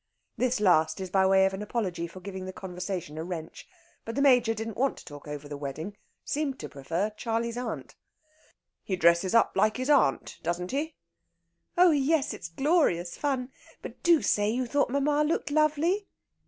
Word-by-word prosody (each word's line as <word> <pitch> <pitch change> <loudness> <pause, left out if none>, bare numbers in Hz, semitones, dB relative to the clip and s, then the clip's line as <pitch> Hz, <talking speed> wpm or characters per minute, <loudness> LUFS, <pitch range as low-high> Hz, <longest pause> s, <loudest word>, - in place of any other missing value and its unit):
This 255 -1 0
last 160 -5 +3
is 190 -1 -5
by 190 0 +4
way 190 0 +5
of 190 - 0
apology 190 -4 -3
for 185 +2 -12
giving 190 0 -6
the 185 - -5
conversation 180 -4 -5
a - - -3
wrench. 165 -2 -7 0.4
But 230 - -6
the 280 - +1
Major 245 -5 +4
didn't 220 -1 -5
want 270 +3 +1
to - - -12
talk 145 -2 -11
over 145 0 -6
the 145 - -6
wedding 150 +8 -6 0.3
seemed 285 -2 -1
to - - -6
prefer 165 +9 -2
"Charley's 230 +2 -2
Aunt." 245 0 -5 0.9
"He 190 - -2
dresses 170 +3 +3
up 230 - +5
like 215 +2 +2
his 255 +3 0
aunt, 260 - +2
doesn't 175 +1 -2
he?" 295 +4 -2 0.8
"Oh 355 0 +7
yes 295 0 +2
it's 170 - -7
glorious 180 - +1
fun! 265 -3 -2 0.3
But - - -9
do 340 -3 +4
say 205 0 +2
you 250 +3 0
thought 280 +3 +1
mamma 290 +3 +2
looked 300 -1 -1
lovely." 310 +7 +2
215 Hz, 180 wpm, -28 LUFS, 175-275 Hz, 0.9 s, Oh